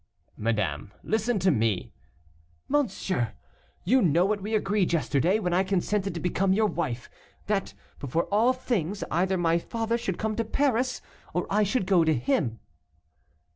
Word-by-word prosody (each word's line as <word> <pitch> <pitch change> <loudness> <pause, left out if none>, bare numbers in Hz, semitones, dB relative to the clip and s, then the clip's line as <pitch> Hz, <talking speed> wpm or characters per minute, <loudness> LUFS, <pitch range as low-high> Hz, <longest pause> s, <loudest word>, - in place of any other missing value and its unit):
"Madame, 105 -6 -1
listen 220 +2 0
to 190 -1 +3
me 110 - 0 0.4
" 80 0 -35
"Monsieur, 190 - 0 0.5
you 255 +8 +4
know 170 0 +3
what 205 0 0
we 215 +3 -2
agreed 200 -3 +1
yesterday, 160 - +2
when 180 -5 -1
I 185 +2 +3
consented 195 0 -1
to - - -3
become 185 +2 +1
your 215 +2 +3
wife, 155 - -2 0.4
that, 205 -2 -1 0.2
before 145 +5 -1
all 225 +5 +5
things, 210 -7 -2
either 185 +3 +1
my 170 -1 +2
father 230 +5 -2
should 190 -6 -3
come 220 -1 -2
to 230 - +1
Paris, 255 +1 0 0.3
or 175 - 0
I 210 +2 +3
should 205 0 +1
go 185 -3 +4
to 160 -1 +2
him." 120 -2 0
185 Hz, 160 wpm, -27 LUFS, 155-215 Hz, 0.5 s, all